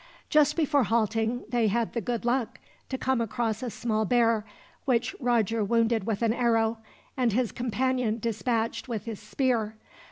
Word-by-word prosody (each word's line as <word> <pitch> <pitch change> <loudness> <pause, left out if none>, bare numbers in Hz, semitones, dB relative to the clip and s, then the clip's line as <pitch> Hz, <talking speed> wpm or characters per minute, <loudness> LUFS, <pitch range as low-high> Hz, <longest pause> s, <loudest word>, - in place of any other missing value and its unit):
Just 300 -1 +4
before 290 -5 +2
halting 225 +2 0
they 240 -3 +2
had 230 +2 0
the 235 - -1
good 235 +2 -3
luck 245 -1 0 0.3
to 260 - -2
come 260 -2 0
across 225 -1 -1
a 250 - -3
small 220 -1 -1
bear, 230 0 +3 0.4
which 245 -4 +1
Roger 230 -4 +1
wounded 230 0 +2
with 220 0 -1
an 225 -1 +3
arrow, 230 -2 +1 0.4
and 245 -5 +1
his 245 0 +1
companion 245 -1 0
dispatched 230 +1 -1
with 230 -3 -4
his 225 -3 -5
spear. 225 -1 -1
230 Hz, 160 wpm, -27 LUFS, 220-245 Hz, 0.4 s, Just